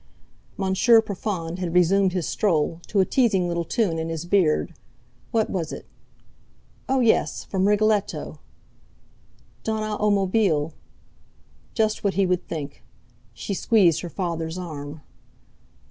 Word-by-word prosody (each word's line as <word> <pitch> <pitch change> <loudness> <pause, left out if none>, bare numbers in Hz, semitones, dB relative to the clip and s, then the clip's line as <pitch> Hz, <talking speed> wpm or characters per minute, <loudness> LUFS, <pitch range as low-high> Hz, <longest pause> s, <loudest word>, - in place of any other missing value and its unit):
Monsieur 195 +5 +4
Profond 185 -5 -4
had 175 -2 -3
resumed 185 +2 +4
his 180 -4 -2
stroll, 165 -4 0
to 200 - +2
a - - +3
teasing 205 -9 +2
little 170 0 -1
tune 175 -3 0
in 160 0 -3
his 165 0 -4
beard. 175 -4 +2 0.6
What 225 -2 0
was 170 -4 -2
it? - - -8 1.0
Oh! 265 -1 +2
yes, 230 -2 +2
from 190 0 0
"Rigoletto": 210 0 0 1.2
"Donna 215 -1 -2
a 210 - +4
mobile." 190 -6 +1 1.0
Just 215 -2 0
what 200 -2 0
he 195 0 +3
would 180 -1 -1
think! 145 -3 -6 0.5
She 200 - -4
squeezed 190 -4 +3
her 175 - -6
father's 165 -2 -3
arm. 150 -4 -7
185 Hz, 130 wpm, -24 LUFS, 165-210 Hz, 1.2 s, Monsieur